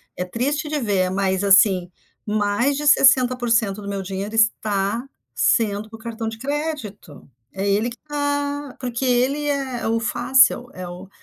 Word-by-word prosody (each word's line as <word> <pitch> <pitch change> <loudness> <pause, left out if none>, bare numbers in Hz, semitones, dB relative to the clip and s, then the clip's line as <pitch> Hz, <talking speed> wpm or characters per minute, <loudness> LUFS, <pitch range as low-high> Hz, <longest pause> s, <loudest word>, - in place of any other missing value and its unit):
é 180 - -3
triste 285 - -2
de 300 -1 -1
ver, 195 -6 0
mas 190 0 0
assim, 190 -2 +4 0.3
mais 210 +6 0
de 295 0 -2
60% 245 -7 +3
do 200 - -7
meu 200 -1 -3
dinheiro 195 +3 -5
está 220 0 +1 0.3
sendo 215 -2 +1
para 225 - -10
o - - -23
cartão 225 0 -5
de 225 - -8
crédito, 265 - -5 0.2
é 195 +1 -3
ele 210 +4 +1
que 240 - -11
tá 285 -1 -3
porque 245 0 -4
ele 260 +4 +1
é 270 -4 -2
o 225 0 +1
fácil, 245 +1 +3
é 185 -1 -7
o 180 +2 -10
230 Hz, 160 wpm, -21 LUFS, 200-265 Hz, 0.3 s, assim